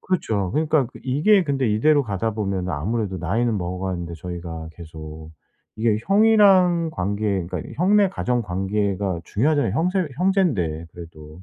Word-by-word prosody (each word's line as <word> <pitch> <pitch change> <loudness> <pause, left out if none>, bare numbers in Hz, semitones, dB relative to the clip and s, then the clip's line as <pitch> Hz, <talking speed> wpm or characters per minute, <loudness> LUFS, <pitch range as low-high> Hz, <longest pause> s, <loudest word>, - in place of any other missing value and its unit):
그렇죠. 110 - -1
그러니까 155 -3 +2
그 120 - -14
이게 170 +10 +3
근데 135 -5 0
이대로 145 +8 +3
가다 110 -1 -2
보면은 95 -4 -2
아무래도 95 +6 -2
나이는 110 +6 0
먹어가는데 90 -1 -4
저희가 85 -1 -7
계속 80 -2 -10 0.5
이게 110 -1 +1
형이랑 195 -4 +4
관계 100 - -2
그러니까 90 -2 -4
형네 200 +4 +4
가정 125 -10 -1
관계가 95 -1 -2
중요하잖아요 145 - +1
형세 180 +1 0
형제인데 140 - 0
그래도. 80 0 -12
105 Hz, 370 characters per minute, -22 LUFS, -, 0.5 s, 형이랑